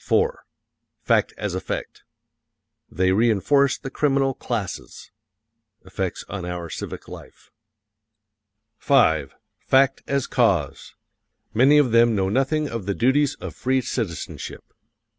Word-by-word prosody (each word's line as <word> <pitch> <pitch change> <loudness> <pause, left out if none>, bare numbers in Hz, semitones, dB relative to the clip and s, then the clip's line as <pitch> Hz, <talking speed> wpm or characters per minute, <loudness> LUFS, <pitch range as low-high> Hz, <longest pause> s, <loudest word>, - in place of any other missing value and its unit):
FACT - - +2
AS - - -3
EFFECT: - - -5 0.9
They 95 +1 +1
reënforce 120 +6 +2
the 135 - -7
criminal 135 -2 +1
classes. 110 -7 -5 0.7
(Effects 95 -1 -4
on 95 +1 -6
our 85 -2 -5
civic - - -7
life.) - - -13 1.3
V. 80 - +3 0.3
FACT 135 0 +3
AS 140 -2 0
CAUSE: - - 0 0.6
Many 135 +6 +5
of 140 -5 +3
them 115 0 +4
know 95 -1 0
nothing 135 +6 +1
of 115 -7 -6
the 100 - -1
duties 135 +4 +2
of - - -8
free 130 +1 0
citizenship. 100 - -5
120 Hz, 110 wpm, -23 LUFS, 95-135 Hz, 1.3 s, Many